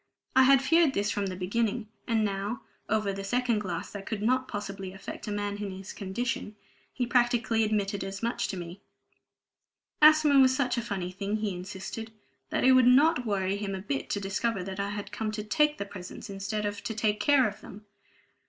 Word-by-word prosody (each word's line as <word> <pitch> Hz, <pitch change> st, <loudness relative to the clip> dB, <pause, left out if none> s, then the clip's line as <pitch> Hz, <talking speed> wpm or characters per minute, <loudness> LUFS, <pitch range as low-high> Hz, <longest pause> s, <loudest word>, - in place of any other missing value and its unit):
I 260 Hz, -, +7 dB
had 270 Hz, 0 st, +6 dB
feared 325 Hz, 0 st, +4 dB
this 205 Hz, +1 st, +1 dB
from 200 Hz, -1 st, -1 dB
the 185 Hz, -, -4 dB
beginning, 215 Hz, +4 st, -1 dB, 0.2 s
and 225 Hz, -3 st, +2 dB
now 200 Hz, +3 st, -3 dB, 0.3 s
(over 215 Hz, -2 st, +1 dB
the 195 Hz, 0 st, -5 dB
second 240 Hz, +2 st, +1 dB
glass 180 Hz, -5 st, -4 dB
that 200 Hz, -1 st, -8 dB
could 210 Hz, -2 st, -3 dB
not 255 Hz, +3 st, +2 dB
possibly 195 Hz, -3 st, -5 dB
affect 195 Hz, -, -8 dB
a -, -, -2 dB
man 205 Hz, 0 st, -2 dB
in 205 Hz, -1 st, -4 dB
his 190 Hz, +1 st, -8 dB
condition) 210 Hz, +2 st, -3 dB, 0.4 s
he 250 Hz, -, -1 dB
practically 235 Hz, -2 st, +2 dB
admitted 205 Hz, -2 st, 0 dB
as 195 Hz, +2 st, -6 dB
much 235 Hz, +1 st, 0 dB
to 190 Hz, -, -4 dB
me. 175 Hz, +2 st, -8 dB, 1.2 s
Asthma 305 Hz, -2 st, +7 dB
was 260 Hz, -1 st, +6 dB
such 260 Hz, -2 st, +1 dB
a 235 Hz, -, -1 dB
funny 190 Hz, -5 st, -4 dB
thing 200 Hz, +3 st, -3 dB
(he 210 Hz, -2 st, -1 dB
insisted) 190 Hz, +5 st, -6 dB, 0.4 s
that -, -, 0 dB
it 260 Hz, -, +7 dB
would 255 Hz, -1 st, +6 dB
not 255 Hz, -1 st, +5 dB
worry 195 Hz, -1 st, 0 dB
him 200 Hz, -1 st, -3 dB
a -, -, -4 dB
bit 140 Hz, -9 st, -3 dB
to 205 Hz, -, -1 dB
discover 195 Hz, +1 st, -1 dB
that 190 Hz, +1 st, -6 dB
I 200 Hz, 0 st, -1 dB
had 205 Hz, 0 st, -5 dB
come 220 Hz, -1 st, -2 dB
to 210 Hz, 0 st, -3 dB
take 300 Hz, +6 st, +2 dB
the 200 Hz, -, -3 dB
presents 190 Hz, 0 st, -9 dB
instead 205 Hz, +2 st, -3 dB
of 205 Hz, 0 st, -4 dB
to 225 Hz, -, -3 dB
take 210 Hz, -1 st, +1 dB
care 280 Hz, -4 st, +4 dB
of 205 Hz, -, -7 dB
them! 210 Hz, +1 st, -11 dB
210 Hz, 205 wpm, -28 LUFS, 195-240 Hz, 1.2 s, I